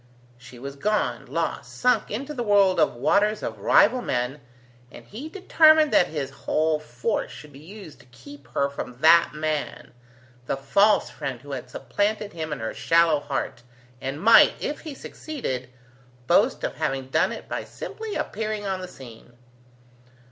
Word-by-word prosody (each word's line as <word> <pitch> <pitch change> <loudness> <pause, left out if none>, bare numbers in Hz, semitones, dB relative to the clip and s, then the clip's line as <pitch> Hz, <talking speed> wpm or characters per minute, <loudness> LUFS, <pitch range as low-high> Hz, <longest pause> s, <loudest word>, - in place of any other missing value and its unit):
She 120 0 -13
was 140 +3 -8
gone, 205 - -1
lost, 130 -4 -3
sunk 250 - +2
into 270 +8 -4
the 255 - -4
world 200 -4 +3
of - - +2
waters 210 - +1
of 110 -2 -5
rival 225 - +4
men, 125 - -2 0.5
and - - -13
he 260 +10 -8
determined 315 -4 +4
that - - +5
his 145 -4 -4
whole 155 +2 0
force 150 - -3
should 150 -1 -12
be 135 - -13
used 180 +1 -12
to - - -19
keep 130 +2 -14
her 140 - +2
from 125 -3 -7
that 165 0 +5
man, 155 -1 -3 0.5
the - - -1
false 200 +11 +3
friend 130 -3 -5
who 145 +1 -11
had 130 -2 -6
supplanted 205 - -2
him 160 -2 -5
in 145 - -4
her 110 - -3
shallow 165 -2 +3
heart, 145 -3 -4 0.4
and 135 +2 -4
might, 225 +6 +7
if 295 - -3
he 310 -4 -8
succeeded, 130 - -6 0.6
boast - - +2
of - - -3
having 135 -1 -2
done - - +2
it - - -8
by - - -4
simply 440 -2 -7
appearing 215 0 -3
on 190 -1 -2
the 185 - -6
scene. 120 -7 -13
155 Hz, 165 wpm, -24 LUFS, 135-210 Hz, 0.6 s, might